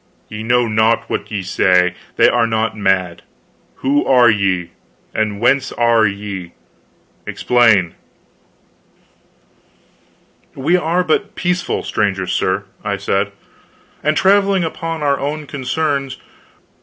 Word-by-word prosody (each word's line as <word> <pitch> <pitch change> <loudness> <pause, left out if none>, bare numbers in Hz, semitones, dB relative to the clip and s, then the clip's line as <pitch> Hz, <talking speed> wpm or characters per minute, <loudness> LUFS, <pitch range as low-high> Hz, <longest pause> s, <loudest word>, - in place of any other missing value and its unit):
Ye 105 0 -6
know 120 +1 +2
not 110 +1 +1
what - - -3
ye 100 -3 -3
say. 90 -1 +2 0.2
They - - +5
are 115 -1 +2
not 110 -1 -1
mad. 95 -4 0 0.5
Who 145 +2 +1
are 125 -3 +5
ye? 95 -4 -1 0.4
And 105 -2 -1
whence 130 +4 +2
are 115 -2 +3
ye? 100 -3 -6 0.7
Explain." 115 -8 +2 2.6
"We 150 +6 +1
are 175 +1 +1
but 205 +5 -1
peaceful 180 0 -1
strangers, 95 -3 -1
sir," 95 +2 0 0.2
I 100 -1 -2
said, 100 +1 -1 0.7
"and 150 +1 +1
traveling 195 -1 +3
upon 165 -1 -4
our 140 -1 +1
own 150 +2 -3
concerns. 140 -1 -2
115 Hz, 115 wpm, -17 LUFS, 100-145 Hz, 2.6 s, They